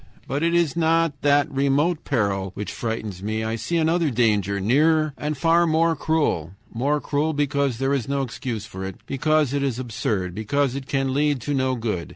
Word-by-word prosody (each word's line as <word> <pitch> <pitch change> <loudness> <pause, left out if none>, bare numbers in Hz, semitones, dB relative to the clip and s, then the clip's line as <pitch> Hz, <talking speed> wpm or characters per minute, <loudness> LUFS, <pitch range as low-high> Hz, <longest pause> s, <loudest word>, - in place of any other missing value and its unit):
But 140 - -2
it 170 +1 +2
is 170 -4 +2
not 165 -3 +1
that 145 -1 +3
remote 140 +5 +1
peril 100 -7 -1
which 105 - -4
frightens 110 -5 -4
me. 110 +2 -2
I 110 +1 -2
see 170 +9 -2
another 165 0 +2
danger, 105 -5 +1
nearer 155 +8 +3
and 150 0 -3
far 170 +3 +3
more 165 +1 +2
cruel; 145 - 0 0.2
more 140 +6 +1
cruel 150 +2 -1
because 140 -3 0
there 135 +2 0
is 135 -3 -1
no 140 0 0
excuse 115 -3 -5
for 95 -3 -8
it, 95 -1 -5
because 150 0 +1
it 140 - 0
is 135 -4 -1
absurd, 105 -7 -2
because 125 +6 0
it 135 0 -6
can 135 -2 0
lead 145 0 +1
to 145 - -2
no 130 -1 +1
good. 110 -8 -3
135 Hz, 195 wpm, -23 LUFS, 110-150 Hz, 0.2 s, that